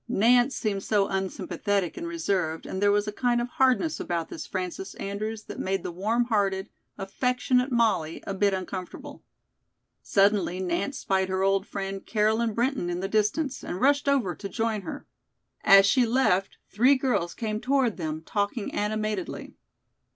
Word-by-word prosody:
Nance 245 Hz, +3 st, +3 dB
seemed 205 Hz, -4 st, -2 dB
so 200 Hz, -1 st, +1 dB
unsympathetic 195 Hz, 0 st, -2 dB
and 340 Hz, -, -5 dB
reserved 190 Hz, -, -1 dB
and 190 Hz, -, -4 dB
there 205 Hz, 0 st, +4 dB
was 205 Hz, +1 st, +1 dB
a -, -, -1 dB
kind 240 Hz, +2 st, +1 dB
of 240 Hz, -, -1 dB
hardness 265 Hz, +6 st, +2 dB
about 170 Hz, -2 st, -3 dB
this -, -, -7 dB
Frances 185 Hz, +1 st, -5 dB
Andrews 215 Hz, +2 st, -4 dB
that -, -, -9 dB
made 190 Hz, -1 st, -1 dB
the -, -, -4 dB
warm 215 Hz, +7 st, 0 dB
hearted, 200 Hz, -3 st, 0 dB, 0.3 s
affectionate 250 Hz, +5 st, 0 dB
Molly 215 Hz, -10 st, +1 dB
a 195 Hz, -, -3 dB
bit 200 Hz, +1 st, +2 dB
uncomfortable. 185 Hz, -1 st, -6 dB, 0.8 s
Suddenly 195 Hz, -2 st, +2 dB
Nance 185 Hz, +10 st, -2 dB
spied 190 Hz, -1 st, 0 dB
her 190 Hz, 0 st, 0 dB
old 195 Hz, 0 st, +2 dB
friend, 195 Hz, -1 st, -5 dB
Caroline 220 Hz, +1 st, +1 dB
Brinton, 240 Hz, -6 st, 0 dB
in 175 Hz, 0 st, -2 dB
the 190 Hz, -, -2 dB
distance, 220 Hz, +7 st, 0 dB
and 180 Hz, -, -5 dB
rushed 285 Hz, +4 st, +3 dB
over 250 Hz, -11 st, +1 dB
to 200 Hz, +4 st, -7 dB
join 225 Hz, -2 st, -1 dB
her. -, -, -7 dB, 0.6 s
As 195 Hz, 0 st, +8 dB
she 245 Hz, +3 st, +3 dB
left, 225 Hz, -6 st, +1 dB
three 250 Hz, +7 st, +4 dB
girls 250 Hz, -10 st, -1 dB
came 215 Hz, -2 st, -3 dB
toward 265 Hz, -4 st, +1 dB
them, 155 Hz, -2 st, -4 dB
talking 205 Hz, +1 st, -2 dB
animatedly. 215 Hz, 0 st, -3 dB
205 Hz, 160 wpm, -26 LUFS, 190-240 Hz, 0.8 s, As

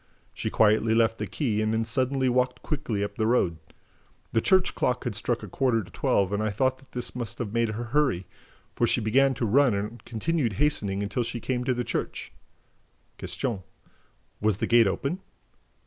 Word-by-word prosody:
She -, -, -3 dB
quietly 110 Hz, +1 st, +3 dB
left 115 Hz, 0 st, +2 dB
the -, -, -2 dB
quay 110 Hz, -8 st, -1 dB
and 110 Hz, 0 st, +1 dB
then 110 Hz, 0 st, 0 dB
suddenly 130 Hz, +3 st, 0 dB
walked 125 Hz, 0 st, +1 dB
quickly 115 Hz, -9 st, -2 dB
up 100 Hz, -, -5 dB
the 110 Hz, -1 st, +1 dB
road. 95 Hz, -9 st, +2 dB, 0.8 s
The 115 Hz, -, +3 dB
church 190 Hz, -, +3 dB
clock 125 Hz, 0 st, 0 dB
had 120 Hz, -, -2 dB
struck 115 Hz, +2 st, -2 dB
a -, -, -6 dB
quarter 115 Hz, +2 st, +1 dB
to -, -, -14 dB
twelve 100 Hz, 0 st, +1 dB
and 105 Hz, -, 0 dB
I 110 Hz, -, 0 dB
thought 130 Hz, +5 st, 0 dB
that 135 Hz, -, -22 dB
this 125 Hz, 0 st, -3 dB
must 120 Hz, -3 st, -4 dB
have 110 Hz, -4 st, -4 dB
made 115 Hz, -1 st, +2 dB
her 110 Hz, +3 st, -3 dB
hurry, 120 Hz, -7 st, +1 dB, 0.5 s
for 120 Hz, -, +2 dB
she 120 Hz, -, +2 dB
began 115 Hz, +5 st, +3 dB
almost 135 Hz, -2 st, 0 dB
to 120 Hz, -, 0 dB
run 125 Hz, +1 st, +4 dB
and 105 Hz, +4 st, -4 dB
continued 120 Hz, +1 st, -1 dB
hastening 100 Hz, -7 st, 0 dB
until 105 Hz, +5 st, -1 dB
she 120 Hz, 0 st, -3 dB
came 125 Hz, +1 st, -2 dB
to 130 Hz, -1 st, +1 dB
the 125 Hz, -, -1 dB
church." -, -, -4 dB, 0.9 s
Q. 120 Hz, -8 st, -3 dB, 0.8 s
"Was 105 Hz, -2 st, +1 dB
the -, -, -1 dB
gate 115 Hz, -2 st, +5 dB
open?" 140 Hz, -, -2 dB
115 Hz, 195 wpm, -27 LUFS, 110-130 Hz, 0.9 s, gate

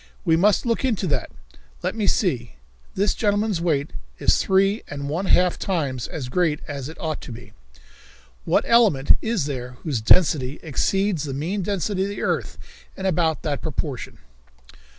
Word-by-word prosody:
We 165 Hz, -2 st, +4 dB
must 200 Hz, +7 st, +3 dB
look 230 Hz, +1 st, 0 dB
into 225 Hz, -7 st, 0 dB
that. 140 Hz, -8 st, -1 dB, 0.5 s
Let -, -, 0 dB
me 215 Hz, -3 st, -1 dB
see? 130 Hz, -, 0 dB, 0.4 s
This 200 Hz, +1 st, +2 dB
gentleman's 205 Hz, -4 st, 0 dB
weight 155 Hz, -4 st, 0 dB, 0.3 s
is -, -, +3 dB
three 195 Hz, +3 st, +2 dB
and 140 Hz, -1 st, -5 dB
one 175 Hz, +6 st, -2 dB
half 180 Hz, -1 st, +3 dB
times 140 Hz, -10 st, -2 dB
as 135 Hz, -5 st, -5 dB
great 155 Hz, +2 st, +1 dB
as 140 Hz, -1 st, -5 dB
it 160 Hz, -, -11 dB
ought 160 Hz, -4 st, -3 dB
to -, -, -9 dB
be. 120 Hz, +1 st, -11 dB, 0.9 s
What -, -, +2 dB
element 210 Hz, -, +4 dB
is 220 Hz, -9 st, 0 dB
there 125 Hz, -3 st, -5 dB
whose 140 Hz, -9 st, -1 dB
density 140 Hz, +1 st, +3 dB
exceeds 175 Hz, +2 st, 0 dB
the 135 Hz, -2 st, -4 dB
mean 175 Hz, +8 st, -2 dB
density 195 Hz, +1 st, -1 dB
of 195 Hz, -, 0 dB
the 205 Hz, -, -5 dB
earth -, -, -1 dB, 0.4 s
in 190 Hz, -, -5 dB
about 165 Hz, -4 st, +1 dB
that 145 Hz, -3 st, -2 dB
proportion?" 150 Hz, -5 st, -4 dB
165 Hz, 165 wpm, -23 LUFS, 140-195 Hz, 0.9 s, We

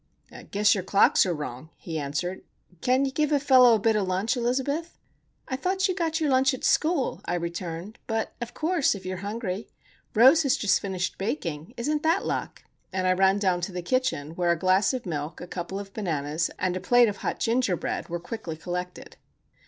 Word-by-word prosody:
"'Guess 205 Hz, +1 st, +3 dB
your 190 Hz, -, -2 dB
clocks 195 Hz, 0 st, +4 dB
are 180 Hz, -, 0 dB
wrong," 150 Hz, 0 st, -7 dB
he 160 Hz, -2 st, -5 dB
answered. 150 Hz, +6 st, -3 dB, 0.4 s
"Can 255 Hz, +2 st, +2 dB
you 270 Hz, -, -2 dB
give 300 Hz, +2 st, 0 dB
a 290 Hz, -, +3 dB
fellow 255 Hz, -4 st, +6 dB
a -, -, 0 dB
bit 220 Hz, +1 st, +2 dB
of 205 Hz, -3 st, 0 dB
lunch, 190 Hz, +7 st, 0 dB
Elizabeth?" 265 Hz, +7 st, -1 dB, 0.5 s
"I 260 Hz, -, -2 dB
thought 375 Hz, +7 st, 0 dB
you 370 Hz, -, 0 dB
got 330 Hz, -3 st, -1 dB
your 305 Hz, -3 st, +1 dB
lunch 265 Hz, +1 st, +3 dB
at -, -, -12 dB
school," 315 Hz, -4 st, +1 dB
I 175 Hz, -, -1 dB
returned. 170 Hz, +4 st, -5 dB
"But, 225 Hz, -1 st, -2 dB
of 240 Hz, 0 st, -6 dB
course,—if 310 Hz, -, 0 dB
you 185 Hz, -, -3 dB
are -, -, -5 dB
hungry. 205 Hz, 0 st, -4 dB, 0.5 s
Rose 260 Hz, +9 st, +7 dB
has 275 Hz, -4 st, +2 dB
just 205 Hz, -, +2 dB
finished 190 Hz, -2 st, -3 dB
baking. 185 Hz, -, -4 dB
Isn't 295 Hz, +5 st, -1 dB
that 330 Hz, +5 st, +1 dB
luck?" -, -, -3 dB, 0.3 s
And 185 Hz, -1 st, -1 dB
I 185 Hz, -, +4 dB
ran 190 Hz, +1 st, +3 dB
down 185 Hz, -3 st, +1 dB
to 175 Hz, -, -3 dB
the 180 Hz, -1 st, -5 dB
kitchen, 245 Hz, -, -1 dB
where 175 Hz, +1 st, -1 dB
a 170 Hz, -, +1 dB
glass 185 Hz, +3 st, +3 dB
of 255 Hz, -4 st, -4 dB
milk, 155 Hz, -2 st, -4 dB
a -, -, -7 dB
couple 180 Hz, +2 st, -5 dB
of 195 Hz, -1 st, -9 dB
bananas, 160 Hz, -5 st, -1 dB
and 185 Hz, -1 st, -1 dB
a -, -, -2 dB
plate 245 Hz, +5 st, +5 dB
of 205 Hz, -2 st, -3 dB
hot -, -, -3 dB
ginger 230 Hz, -4 st, +1 dB
bread -, -, -4 dB
were 175 Hz, 0 st, -3 dB
quickly 175 Hz, -3 st, -6 dB
collected. 180 Hz, +2 st, -6 dB
200 Hz, 205 wpm, -26 LUFS, 180-260 Hz, 0.5 s, Rose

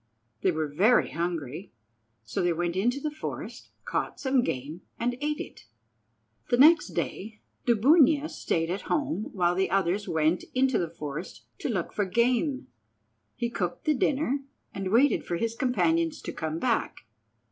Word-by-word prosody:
They 190 Hz, -, +3 dB
were 155 Hz, -2 st, -1 dB
very 195 Hz, +12 st, +3 dB
hungry, 165 Hz, 0 st, -4 dB, 0.5 s
so 110 Hz, -, -3 dB
they 175 Hz, -1 st, +2 dB
went 170 Hz, +1 st, -2 dB
into 240 Hz, +8 st, +1 dB
the 300 Hz, +1 st, -3 dB
forest, 305 Hz, -, -7 dB, 0.2 s
caught -, -, -2 dB
some 265 Hz, -2 st, +2 dB
game, 150 Hz, -, -4 dB, 0.2 s
and 245 Hz, +1 st, -1 dB
ate 300 Hz, 0 st, -1 dB
it. -, -, -8 dB, 0.8 s
The 240 Hz, -, +3 dB
next 320 Hz, +6 st, +6 dB
day 210 Hz, +2 st, -4 dB, 0.3 s
Dubunia 285 Hz, +6 st, +5 dB
stayed 165 Hz, -, -1 dB
at 195 Hz, -, -5 dB
home 290 Hz, -7 st, -1 dB
while 175 Hz, -3 st, +1 dB
the 190 Hz, +1 st, 0 dB
others 195 Hz, +1 st, 0 dB
went 160 Hz, +1 st, +1 dB
into 260 Hz, -2 st, +3 dB
the 170 Hz, -, -1 dB
forest 150 Hz, +1 st, -7 dB
to -, -, -3 dB
look 185 Hz, -8 st, -2 dB
for 205 Hz, -, 0 dB
game. 245 Hz, -, +1 dB, 0.7 s
He 240 Hz, -1 st, -2 dB
cooked 180 Hz, -6 st, -3 dB
the 310 Hz, -, +4 dB
dinner, 280 Hz, 0 st, +1 dB, 0.3 s
and 195 Hz, -1 st, -3 dB
waited 265 Hz, +6 st, +4 dB
for 175 Hz, -, -3 dB
his 230 Hz, +4 st, -1 dB
companions 175 Hz, -10 st, +1 dB
to -, -, -5 dB
come 160 Hz, 0 st, -3 dB
back. 230 Hz, +5 st, -1 dB
205 Hz, 160 wpm, -27 LUFS, 170-260 Hz, 0.8 s, next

